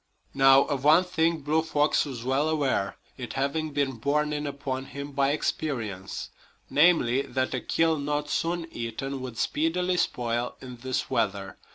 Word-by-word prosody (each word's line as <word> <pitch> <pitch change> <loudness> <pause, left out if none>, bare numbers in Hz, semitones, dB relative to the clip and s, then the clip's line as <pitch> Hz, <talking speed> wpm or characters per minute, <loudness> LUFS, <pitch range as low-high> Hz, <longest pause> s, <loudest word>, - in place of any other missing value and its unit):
Now, 135 0 +6
of 140 -3 -3
one 155 +5 +6
thing 165 -2 0
Blue 155 +3 +1
Fox 150 -2 +2
was 130 -5 -6
well 135 +4 +1
aware, 135 -10 0 0.2
it 125 -3 -6
having 140 +4 -1
been 140 -3 -1
borne 150 +5 0
in 150 0 -2
upon 135 -2 -4
him 140 +1 -7
by 140 0 +2
experience 115 -10 -3 0.4
viz., 140 -5 +4
that 130 0 0
a 130 - -1
kill 160 -2 +1
not 145 +1 -2
soon 170 +2 -1
eaten 130 +4 -4
would 125 -3 -7
speedily 180 +6 0
spoil 120 -6 -1
in 125 -1 -9
this 130 +1 -3
weather. 100 -2 -1
140 Hz, 160 wpm, -27 LUFS, 130-155 Hz, 0.4 s, Now